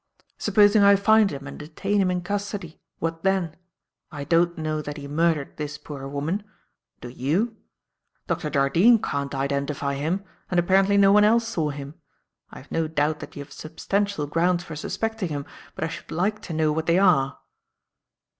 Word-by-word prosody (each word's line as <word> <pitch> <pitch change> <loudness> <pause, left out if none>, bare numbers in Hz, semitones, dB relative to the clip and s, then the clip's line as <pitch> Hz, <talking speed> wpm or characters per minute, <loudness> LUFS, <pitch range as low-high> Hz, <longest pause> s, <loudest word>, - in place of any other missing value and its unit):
Supposing 205 0 +4
I 200 0 +7
find 215 +1 +4
him 140 -3 -7
and 135 - -8
detain 195 +7 -1
him 185 - +2
in 180 -1 -1
custody? 200 -3 -4 0.2
What 165 0 -3
then? 190 -4 0 0.6
I 145 -2 -6
don't 170 +3 +2
know 155 -1 -2
that 145 0 -6
he 140 -1 -7
murdered 155 -1 0
this 150 0 -4
poor 140 -2 -8
woman. 150 +9 -2 0.6
Do 120 - -7
you? 160 - -1 0.7
Dr. 150 - -2
Jardine 160 - +4
can't 140 -6 -3
identify 140 +1 -1
him, 160 +8 -2 0.3
and 180 - +2
apparently 195 +3 +3
no 195 -1 +6
one 210 +1 +6
else 225 +2 +4
saw 165 -10 -1
him. 140 0 -7 0.6
I - - -12
have - - -14
no 165 -1 0
doubt 155 0 0
that - - -10
you 145 - -6
have 145 - -15
substantial 200 +1 -2
grounds 175 +4 +1
for 160 - -8
suspecting 220 +5 -3
him, 145 -2 -4 0.3
but - - -4
I - - +1
should 165 - -8
like 200 +6 -1
to 170 - -7
know 155 -1 +2
what 160 +2 -2
they 170 +1 +4
are." 160 -8 +3
165 Hz, 180 wpm, -24 LUFS, 145-195 Hz, 0.7 s, I